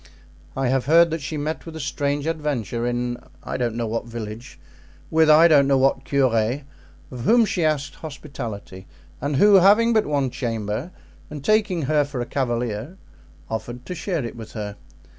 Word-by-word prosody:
I 135 Hz, -2 st, +1 dB
have 130 Hz, -1 st, +1 dB
heard 165 Hz, +2 st, +6 dB
that 160 Hz, -1 st, -2 dB
she 155 Hz, +2 st, -4 dB
met 150 Hz, +2 st, -3 dB
with 165 Hz, -, -8 dB
a -, -, -6 dB
strange 145 Hz, 0 st, -2 dB
adventure 140 Hz, -, -2 dB
in 120 Hz, 0 st, -2 dB, 0.3 s
I -, -, -5 dB
don't 120 Hz, -3 st, -1 dB
know 120 Hz, 0 st, -1 dB
what 115 Hz, +2 st, -3 dB
village, 115 Hz, 0 st, -8 dB, 0.5 s
with 160 Hz, -1 st, +4 dB
I 155 Hz, +2 st, +8 dB
don't 145 Hz, -4 st, +5 dB
know 135 Hz, -1 st, +4 dB
what 135 Hz, 0 st, +2 dB
curé, 130 Hz, -1 st, +1 dB, 0.5 s
of 125 Hz, -, -7 dB
whom 235 Hz, 0 st, +5 dB
she 185 Hz, -4 st, -1 dB
asked 145 Hz, -2 st, 0 dB
hospitality 120 Hz, -, -8 dB, 0.3 s
and 145 Hz, 0 st, -1 dB
who, 205 Hz, +9 st, +5 dB
having 210 Hz, +5 st, +5 dB
but 220 Hz, -1 st, +2 dB
one 140 Hz, -3 st, 0 dB
chamber, 115 Hz, -, -3 dB, 0.4 s
and 145 Hz, -2 st, -8 dB
taking 210 Hz, -6 st, +2 dB
her 150 Hz, +2 st, +2 dB
for 140 Hz, -2 st, -6 dB
a 120 Hz, -, -2 dB
cavalier, 120 Hz, -, -2 dB, 0.5 s
offered 120 Hz, +2 st, -5 dB
to -, -, -5 dB
share 165 Hz, -4 st, -2 dB
it 115 Hz, -, -6 dB
with 115 Hz, -2 st, -10 dB
her. 105 Hz, -2 st, -5 dB
140 Hz, 180 wpm, -23 LUFS, 120-160 Hz, 0.5 s, I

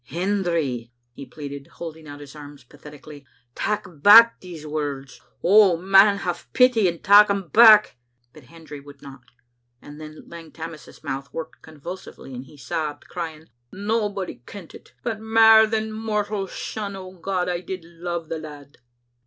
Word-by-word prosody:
" -, -, -49 dB
Hendry," 170 Hz, -, -2 dB, 0.2 s
he 135 Hz, +2 st, -11 dB
pleaded, 140 Hz, -2 st, -9 dB
holding 160 Hz, -2 st, -9 dB
out 145 Hz, 0 st, -10 dB
his 145 Hz, 0 st, -12 dB
arms 145 Hz, -2 st, -12 dB
patheti 145 Hz, +3 st, -15 dB
cally, 145 Hz, -2 st, -13 dB, 0.3 s
"tak' 210 Hz, +7 st, -2 dB, 0.2 s
back 230 Hz, +5 st, +8 dB
these 170 Hz, -4 st, -11 dB
words. 145 Hz, -3 st, -5 dB, 0.2 s
Oh, 195 Hz, -2 st, +5 dB
man, 195 Hz, +3 st, +5 dB
have 175 Hz, -3 st, -5 dB
pity, 250 Hz, -6 st, +4 dB
andtak' 205 Hz, +5 st, +5 dB
them 200 Hz, -4 st, -3 dB
back!" 215 Hz, -, +6 dB, 0.4 s
But 150 Hz, -4 st, -16 dB
Hendry 155 Hz, 0 st, -12 dB
would 140 Hz, 0 st, -16 dB
not, 135 Hz, -2 st, -12 dB, 0.6 s
and 145 Hz, +4 st, -13 dB
then 155 Hz, 0 st, -12 dB
Lang 165 Hz, -2 st, -12 dB
Tammas's 165 Hz, -1 st, -11 dB
mouth 135 Hz, +1 st, -6 dB
worked 165 Hz, -, -8 dB
convulsively, 160 Hz, -2 st, -11 dB
and 125 Hz, +1 st, -8 dB
he 145 Hz, -, -17 dB
sobbed, 145 Hz, +2 st, -5 dB
crying, 160 Hz, -3 st, -7 dB, 0.2 s
" -, -, -49 dB
Nobody 205 Hz, -, -3 dB
kent 195 Hz, -5 st, -11 dB
it, -, -, -16 dB
but 225 Hz, -4 st, -3 dB
mair 220 Hz, 0 st, +5 dB
than 220 Hz, 0 st, -2 dB
mortal 210 Hz, -2 st, -3 dB
son, 200 Hz, +1 st, -6 dB
O 185 Hz, -1 st, -9 dB
God, 185 Hz, 0 st, -3 dB
I 175 Hz, -1 st, -2 dB
did 185 Hz, -2 st, -7 dB
love 170 Hz, 0 st, -6 dB
the 160 Hz, -, -5 dB
lad!" 145 Hz, -2 st, -12 dB
170 Hz, 160 wpm, -22 LUFS, 145-200 Hz, 0.6 s, back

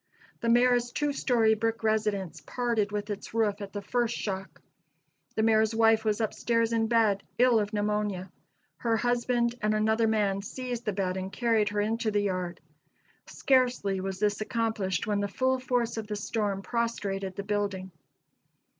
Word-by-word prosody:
The 230 Hz, -, -1 dB
Mayor's 245 Hz, 0 st, +4 dB
two 295 Hz, +2 st, -1 dB
story 230 Hz, -5 st, +3 dB
brick 225 Hz, +1 st, -1 dB
residence 210 Hz, -7 st, 0 dB
parted 235 Hz, -4 st, 0 dB
with 210 Hz, 0 st, -3 dB
its 205 Hz, +2 st, -7 dB
roof 210 Hz, -2 st, +1 dB
at 200 Hz, -1 st, -6 dB
the 205 Hz, 0 st, -5 dB
first 235 Hz, +2 st, 0 dB
shock. 195 Hz, -2 st, -5 dB, 0.8 s
The 220 Hz, -, +1 dB
Mayor's 220 Hz, 0 st, +3 dB
wife 225 Hz, -1 st, +4 dB
was 215 Hz, -1 st, 0 dB
up 220 Hz, -2 st, -1 dB
stairs 230 Hz, -1 st, +1 dB
in 225 Hz, -1 st, +2 dB
bed, 220 Hz, -4 st, +3 dB, 0.2 s
ill 245 Hz, -2 st, +5 dB
of 205 Hz, -1 st, -2 dB
pneumonia. 210 Hz, -3 st, -1 dB, 0.5 s
Her 230 Hz, -1 st, +1 dB
husband 240 Hz, 0 st, +1 dB
and 215 Hz, 0 st, +1 dB
another 220 Hz, +1 st, +2 dB
man 205 Hz, -3 st, +1 dB
seized 245 Hz, +3 st, -5 dB
the 210 Hz, -, +1 dB
bed 190 Hz, -1 st, -1 dB
and 190 Hz, 0 st, -4 dB
carried 225 Hz, -3 st, +1 dB
her 205 Hz, 0 st, 0 dB
into 225 Hz, +1 st, 0 dB
the 205 Hz, -1 st, +1 dB
yard. 185 Hz, -3 st, -3 dB, 0.7 s
Scarcely 250 Hz, -8 st, +1 dB
was 190 Hz, 0 st, -4 dB
this 205 Hz, +1 st, 0 dB
accomplished 220 Hz, -5 st, -1 dB
when 210 Hz, -2 st, 0 dB
the 200 Hz, -, 0 dB
full 260 Hz, +5 st, 0 dB
force 245 Hz, -2 st, -1 dB
of 220 Hz, -1 st, -4 dB
the 210 Hz, -, -3 dB
storm 205 Hz, -1 st, -2 dB
prostrated 200 Hz, -5 st, -2 dB
the 200 Hz, -, -4 dB
building. 200 Hz, -2 st, -2 dB
215 Hz, 170 wpm, -28 LUFS, 200-230 Hz, 0.8 s, ill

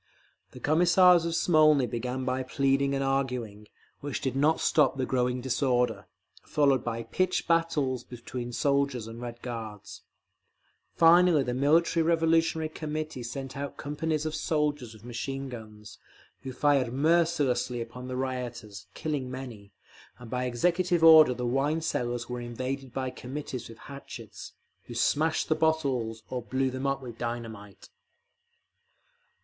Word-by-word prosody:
The -, -, -12 dB
Commissars 175 Hz, +2 st, +5 dB
of 165 Hz, -, -2 dB
Smolny 155 Hz, -5 st, +4 dB
began 125 Hz, +2 st, -3 dB
by 130 Hz, 0 st, -1 dB
pleading 135 Hz, +1 st, +1 dB
and 135 Hz, -, -1 dB
arguing, 125 Hz, -6 st, -2 dB, 0.3 s
which 145 Hz, -2 st, -4 dB
did 130 Hz, -1 st, -2 dB
not 150 Hz, +4 st, +3 dB
stop 145 Hz, -3 st, +3 dB
the 130 Hz, -, 0 dB
growing 125 Hz, -1 st, 0 dB
disorder, 125 Hz, -4 st, 0 dB, 0.3 s
followed 140 Hz, -4 st, +2 dB
by 115 Hz, -1 st, -3 dB
pitched 185 Hz, +8 st, -1 dB
battles 150 Hz, -7 st, +1 dB
between 120 Hz, 0 st, -7 dB
soldiers 140 Hz, -2 st, 0 dB
and 115 Hz, +1 st, -9 dB
Red 120 Hz, -1 st, -7 dB
Guards…. 110 Hz, -4 st, -7 dB, 0.9 s
Finally 170 Hz, -2 st, +6 dB
the 125 Hz, -1 st, -2 dB
Military 160 Hz, +6 st, +3 dB
Revolutionary 165 Hz, -1 st, +2 dB
Committee 155 Hz, -3 st, -5 dB
sent 135 Hz, +3 st, -6 dB
out 140 Hz, 0 st, -5 dB
companies 155 Hz, +1 st, -2 dB
of 155 Hz, -, -2 dB
sailors 150 Hz, -6 st, -1 dB
with 110 Hz, +1 st, -16 dB
machine 135 Hz, +3 st, -5 dB
guns, 110 Hz, -3 st, -11 dB, 0.4 s
who 130 Hz, -, -6 dB
fired 135 Hz, -2 st, +2 dB
mercilessly 145 Hz, -4 st, +1 dB
upon 120 Hz, +2 st, -7 dB
the 130 Hz, 0 st, -4 dB
rioters, 120 Hz, -6 st, -5 dB
killing 145 Hz, -5 st, -3 dB
many; 120 Hz, -6 st, -8 dB, 0.5 s
and 120 Hz, -2 st, -12 dB
by 125 Hz, 0 st, -1 dB
executive 175 Hz, +7 st, +1 dB
order 155 Hz, -5 st, +8 dB
the 125 Hz, -, -3 dB
wine 135 Hz, +6 st, +1 dB
cellars 120 Hz, -7 st, -2 dB
were 125 Hz, 0 st, -5 dB
invaded 130 Hz, +2 st, -5 dB
by 130 Hz, 0 st, -3 dB
Committees 130 Hz, -1 st, -6 dB
with 115 Hz, -, -11 dB
hatchets, 140 Hz, +4 st, -10 dB, 0.3 s
who -, -, -9 dB
smashed 155 Hz, +2 st, +1 dB
the -, -, +3 dB
bottles—or 130 Hz, -7 st, -1 dB
blew 130 Hz, +2 st, -1 dB
them 130 Hz, +2 st, -3 dB
up 135 Hz, 0 st, -1 dB
with 120 Hz, -2 st, -9 dB
dynamite…. 115 Hz, -4 st, -6 dB
130 Hz, 140 wpm, -28 LUFS, 120-155 Hz, 0.9 s, order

